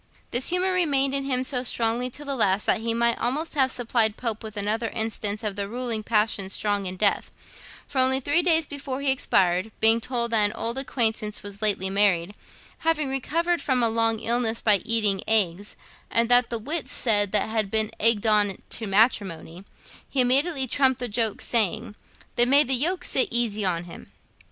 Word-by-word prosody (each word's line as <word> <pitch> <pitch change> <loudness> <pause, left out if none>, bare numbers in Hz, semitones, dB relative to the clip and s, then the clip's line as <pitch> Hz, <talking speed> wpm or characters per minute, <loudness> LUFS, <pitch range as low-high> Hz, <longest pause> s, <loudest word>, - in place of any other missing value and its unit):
This 245 +2 +2
humour 365 +1 +1
remained 280 -7 +2
in 275 0 0
him 255 -2 0
so 255 -1 +1
strongly 240 0 -1
to 290 +4 -8
the 280 - -2
last 200 -4 +1
that 225 - +2
he 230 0 -2
might 235 0 +1
almost 280 +8 -2
have 270 -3 +2
supplied 230 -3 0
Pope 225 -3 -3
with 215 -2 -10
another 220 +3 -2
instance 220 -2 -3
of 210 -2 -3
'the 200 -1 -4
ruling 235 -1 -3
passion 210 -3 0
strong 205 -1 0
in 185 0 -6
death,' 200 +1 0 0.6
for 275 - -3
only 260 +1 +4
three 290 +6 +1
days 330 -3 +2
before 275 -2 -6
he 280 -1 +2
expired, 185 -5 +1
being 225 +1 +4
told 235 -1 -3
that 220 -2 +4
an 205 +1 0
old 235 +3 -2
acquaintance 225 -6 -1
was 200 0 -9
lately 195 -3 +1
married, 195 -2 +1 0.5
having 315 -3 0
recovered 335 +6 -1
from 255 -3 0
a 230 - +2
long 225 0 0
illness 230 0 0
by 210 -2 +3
eating 215 -2 0
eggs, 205 -2 +1 0.3
and 230 0 +1
that 245 0 +4
the 235 - -3
wits 270 +3 -4
said 205 -4 +1
that 215 - +1
he - - -7
had 215 -3 -1
been 220 +1 -1
egged 230 -1 +3
on 210 -3 +2
to 220 - -3
matrimony, 195 -4 0 0.4
he 275 - -3
immediately 270 +3 +2
trumped 260 0 +1
the 245 - -3
joke, 220 -1 -1
saying, 215 -3 -1 0.4
'Then 240 +1 +5
may 285 +2 +6
the 265 - 0
yoke 330 +9 +1
sit 260 - +2
easy 230 -3 -1
on 175 -3 -1
him.' 170 - -12
230 Hz, 195 wpm, -24 LUFS, 210-260 Hz, 0.6 s, may